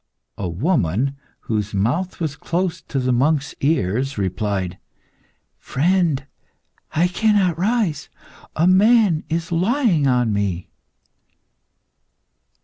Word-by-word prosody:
A 95 Hz, -3 st, -2 dB
woman, 120 Hz, -, 0 dB, 0.3 s
whose 105 Hz, -2 st, -3 dB
mouth 130 Hz, -, -1 dB
was 155 Hz, -4 st, -2 dB
close 175 Hz, +2 st, -2 dB
to 140 Hz, -, -6 dB
the 130 Hz, -1 st, +1 dB
monk's 145 Hz, +3 st, +1 dB
ear, 125 Hz, -, +1 dB
replied 95 Hz, -2 st, -2 dB, 0.8 s
"Friend, 165 Hz, -2 st, +1 dB, 0.7 s
I 165 Hz, +3 st, +3 dB
cannot 190 Hz, -3 st, +1 dB
rise; 205 Hz, -5 st, 0 dB, 0.5 s
a 160 Hz, -, +2 dB
man 195 Hz, -2 st, +4 dB
is 165 Hz, +2 st, -2 dB
lying 185 Hz, -, +2 dB
on 125 Hz, -4 st, +2 dB
me." 100 Hz, -4 st, -2 dB
155 Hz, 100 wpm, -21 LUFS, 110-180 Hz, 0.8 s, man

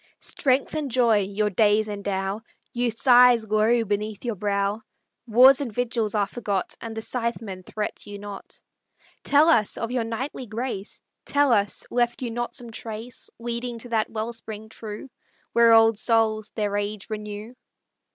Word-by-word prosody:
Strength 265 Hz, -1 st, 0 dB
and 305 Hz, -3 st, -2 dB
joy 235 Hz, -3 st, +3 dB
your 205 Hz, +2 st, -1 dB
days 210 Hz, +2 st, +3 dB
endow, 200 Hz, 0 st, -3 dB, 0.3 s
Youth's 240 Hz, -1 st, -1 dB
eyes 245 Hz, -2 st, +7 dB
glow 220 Hz, +2 st, +2 dB
beneath 210 Hz, +1 st, -3 dB
your 235 Hz, -, -1 dB
brow; 200 Hz, +1 st, -1 dB, 0.5 s
Wars 255 Hz, +5 st, +7 dB
and 260 Hz, -5 st, -3 dB
vigils 230 Hz, -2 st, -1 dB
are 205 Hz, -1 st, +2 dB
forgot, 200 Hz, -3 st, -3 dB
And 225 Hz, -1 st, -7 dB
the 220 Hz, -, -3 dB
Scytheman 225 Hz, -6 st, -3 dB
threats 210 Hz, 0 st, -4 dB
you 205 Hz, 0 st, -7 dB
not. 200 Hz, -1 st, -10 dB, 0.6 s
Tell 295 Hz, +2 st, +4 dB
us, 225 Hz, -11 st, +3 dB
of 230 Hz, +1 st, -3 dB
your 250 Hz, -2 st, 0 dB
knightly 245 Hz, +3 st, -5 dB
grace, 220 Hz, -2 st, -5 dB, 0.2 s
Tell 285 Hz, -3 st, +3 dB
us, 205 Hz, -2 st, 0 dB
left 240 Hz, +1 st, 0 dB
you 240 Hz, -, -3 dB
not 240 Hz, +1 st, -4 dB
some 240 Hz, -4 st, -8 dB
trace 225 Hz, +2 st, -7 dB
Leading 235 Hz, +1 st, -4 dB
to 240 Hz, +2 st, -9 dB
that 225 Hz, -1 st, 0 dB
wellspring 220 Hz, -1 st, -6 dB
true 215 Hz, +1 st, -8 dB, 0.5 s
Where 235 Hz, 0 st, +6 dB
old 225 Hz, -1 st, +6 dB
souls 220 Hz, -2 st, +2 dB
their 205 Hz, -2 st, -1 dB
age 205 Hz, 0 st, -4 dB
renew? 210 Hz, +1 st, -6 dB
225 Hz, 155 wpm, -24 LUFS, 210-240 Hz, 0.6 s, eyes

